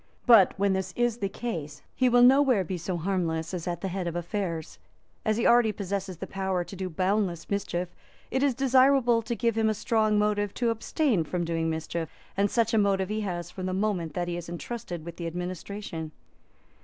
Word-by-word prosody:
But, 225 -7 +6
when 200 0 +2
this 190 -1 -2
is 240 -1 +1
the 195 - -1
case, 160 -10 -5
he 255 -1 +3
will 245 0 +5
nowhere 260 -5 +5
be 185 +1 -4
so 175 +1 -3
harmless 165 -2 -1
as 175 -2 -4
at 175 -1 -3
the 195 - -2
head 185 -1 -3
of 170 - -3
affairs. 175 -2 -3 0.4
As 215 0 +1
he 235 - 0
already 235 -2 +5
possesses 195 -2 -4
the 190 - -5
power 190 -2 -2
to 195 - -10
do 185 0 -4
boundless 185 0 0
mischief, 180 -3 -2 0.4
it 265 - +1
is 275 -3 +2
desirable 260 -2 +4
to 235 +1 -3
give 230 -1 0
him 220 -1 +2
a 215 - 0
strong 215 0 +1
motive 205 -1 +1
to 235 -2 +1
abstain 230 - 0
from 175 +2 -2
doing 165 -1 -1
mischief; 160 +1 -3 0.3
and 200 +1 +2
such 230 0 +1
a 220 - +4
motive 195 -2 +1
he 215 +1 -1
has 175 -3 -4
from 185 0 -5
the 185 - -2
moment 185 -6 -1
that 175 -1 -1
he 175 0 -2
is 170 -1 -7
entrusted 175 -2 -6
with 170 -1 -8
the 170 - -4
administration. 180 -1 -5
195 Hz, 205 wpm, -27 LUFS, 175-220 Hz, 0.4 s, But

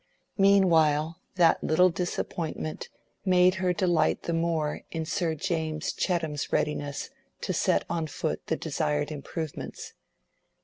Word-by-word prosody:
Meanwhile 165 -5 +4 0.2
that 175 -3 +4
little 180 +3 +4
disappointment 165 -2 -3 0.3
made 185 -1 +5
her 180 -1 +2
delight 175 -4 +1
the 170 - -2
more 165 -2 0
in 160 -1 -3
Sir 170 -1 -1
James 160 -2 -2
Chettam's 160 -5 -1
readiness 145 - -1 0.3
to 185 - -2
set 180 +1 +2
on 165 -2 -2
foot 155 +1 -3
the 160 - +1
desired 150 -1 -1
improvements. 155 +1 -6
165 Hz, 120 wpm, -28 LUFS, 155-180 Hz, 0.3 s, made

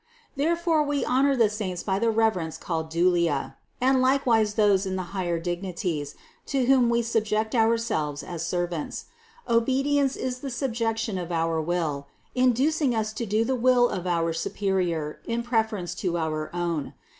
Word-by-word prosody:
Therefore 330 +2 +1
we 290 -2 0
honor 275 +2 +3
the 230 -4 +4
saints 205 -4 -4
by 195 -1 0
the 230 +1 +2
reverence 220 -8 +1
called 160 -2 -3
dulia, 170 -3 +1 0.2
and 260 +1 +3
likewise 240 -5 +2
those 205 -3 +3
in 190 - -2
the 185 - -2
higher 175 -3 -1
dignities, 175 -3 -3 0.3
to 270 -2 +1
whom 255 -2 +4
we 235 0 +2
subject 220 -1 0
ourselves 220 - +1
as 170 -2 -5
servants. 175 -2 -3 0.4
Obedience 270 +4 +2
is 255 -1 -3
the 275 - -5
subjection 225 -5 -2
of 175 -1 -5
our 165 -1 0
will, 155 -4 -2 0.3
inducing 255 +2 +2
us 215 -1 -1
to 230 +1 -4
do 215 +3 +1
the 260 - 0
will 250 -1 +4
of 180 -1 -4
our 165 -1 +1
superior 170 -4 -1
in 235 0 -2
preference 220 -7 -1
to 180 -2 -2
our 155 -1 -2
own. 170 -4 -3
215 Hz, 155 wpm, -26 LUFS, 175-245 Hz, 0.4 s, the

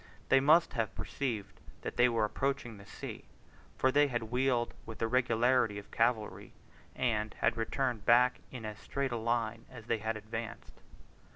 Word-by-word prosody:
They - - +6
then 135 - +2
must 160 +3 +5
have 115 -5 -2
perceived 115 -8 -4 0.2
that - - -4
they 125 0 +5
were 115 -2 +2
approaching 120 -1 -2
the 100 - -14
sea, - - -8 0.5
for 130 - +3
they 145 +2 +5
had 120 -4 -3
wheeled 125 -1 +1
with 110 -1 -8
the 115 - 0
regularity 120 -2 +2
of 100 - -10
cavalry, 115 -2 0 0.4
and 110 -4 0
had - - +1
returned 115 0 -1
back 125 +2 +5
in 125 -4 -7
as 105 0 -6
straight 140 -1 -2
a 120 - -1
line 115 0 -1
as 110 -4 -11
they 115 -1 0
had 110 +1 -2
advanced. 110 +2 -7
115 Hz, 175 wpm, -32 LUFS, 110-125 Hz, 0.5 s, They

